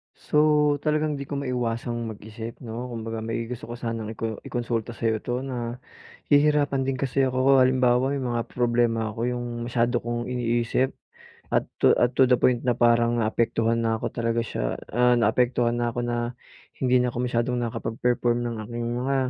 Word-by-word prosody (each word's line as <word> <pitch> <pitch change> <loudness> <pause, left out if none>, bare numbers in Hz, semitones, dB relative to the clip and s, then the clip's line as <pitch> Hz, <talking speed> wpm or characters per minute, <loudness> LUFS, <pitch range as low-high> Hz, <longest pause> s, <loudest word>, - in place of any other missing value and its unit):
So, - - -2 0.4
talagang 150 0 0
hindi 140 -1 -6
ko 145 - -4
maiwasang 120 -3 -2
mag-isip 110 +2 -9
'no, 120 +2 -5
kumbaga 115 -2 -5
may 115 +1 -3
gusto 125 -2 -6
ko 120 - -6
sanang 115 -2 -4
iko 110 -1 -4
i-konsulta 120 -1 -3
sa'yo 110 -1 0
'to 125 +4 -3 0.6
nahihirapan 145 -2 +2
din 130 0 -1
kasi 135 +1 0
ako. 130 +1 +4
Halimbawa 130 0 +3
may 140 - -1
mga 120 -2 -1
problema 120 -2 +1
ako 115 - -7
'yong 120 0 -3 0.2
masyado 120 +1 +1
kong 120 0 -3
iniisip 120 +1 0 0.6
at - - +1 0.2
to - - +7
at 120 +1 +2
to 130 -1 +4
the 125 - +5
point 125 -2 +2
na 125 -2 0
parang 120 0 +3
naapektuhan 115 +1 +1
na 115 -1 +1
ako - - -3
talaga 115 0 0
siya, 85 - -3 0.2
ah, 125 0 +4
naapektuhan 120 +1 +2
na 120 0 0
ako 120 - -3
na 120 0 -1 0.6
hindi 125 -1 +3
na 125 - 0
ako 120 - -6
masyadong 120 +1 0
nakapag-perform 120 +1 0
ng 120 -1 -3
aking 120 +2 -4 0.2
mga, 135 +1 0
120 Hz, 170 wpm, -25 LUFS, 115-125 Hz, 0.6 s, to